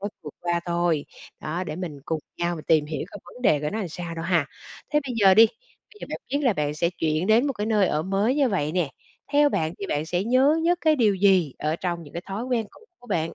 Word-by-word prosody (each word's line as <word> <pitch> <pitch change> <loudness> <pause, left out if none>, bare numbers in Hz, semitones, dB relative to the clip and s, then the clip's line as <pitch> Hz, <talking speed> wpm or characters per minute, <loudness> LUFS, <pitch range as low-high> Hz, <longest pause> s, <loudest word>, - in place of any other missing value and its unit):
mới 205 - -3
vượt - - -9
qua 175 0 0
thôi, 170 -3 +1 0.4
đó, 170 +4 -3
để 155 - -5
mình 165 -6 -5
cùng 160 -2 -2 0.2
nhau 175 0 0
mình 155 - -9
tìm 155 -2 +3
hiểu 155 +1 -4
coi - - -9
vấn 250 - -13
đề 150 -10 +4
của 150 - -2
nó 220 - -2
làm 190 -5 -3
sao 170 +1 -6
đâu 165 0 -5
ha. 175 -1 +2 0.5
Thế 295 - +4
bây 250 - -3
giờ 195 -4 +6
đi, 225 +1 +8
bây 430 - -21
giờ - - -6
bạn - - -3
biết 285 - 0
là 250 - +4
bạn 150 -3 -2
sẽ 170 +3 0
chuyển 160 0 -1
đến 230 +6 +4
một 275 - 0
cái 210 -3 -3
nơi 210 -3 +3
ở 155 -2 0
mới 195 +7 +1
như 280 -3 +3
vậy 155 -7 -1
nè. 175 -6 0 0.4
Theo 290 0 +5
bạn 160 - -1
thì 200 - -4
bạn 150 -1 -2
sẽ 175 +3 -1
nhớ 265 +6 +4
nhất 350 +1 +2
cái 310 -2 +3
điều 215 -5 +3
gì 185 -7 +3
ở 155 +2 -1
trong 175 -2 -3
những 145 - -13
cái 170 - -4
thói 200 +4 -4
quen 245 -4 -1
cũ - - -19 0.2
của 245 - -17
bạn? 185 -7 0
185 Hz, 275 wpm, -25 LUFS, 160-225 Hz, 0.5 s, đi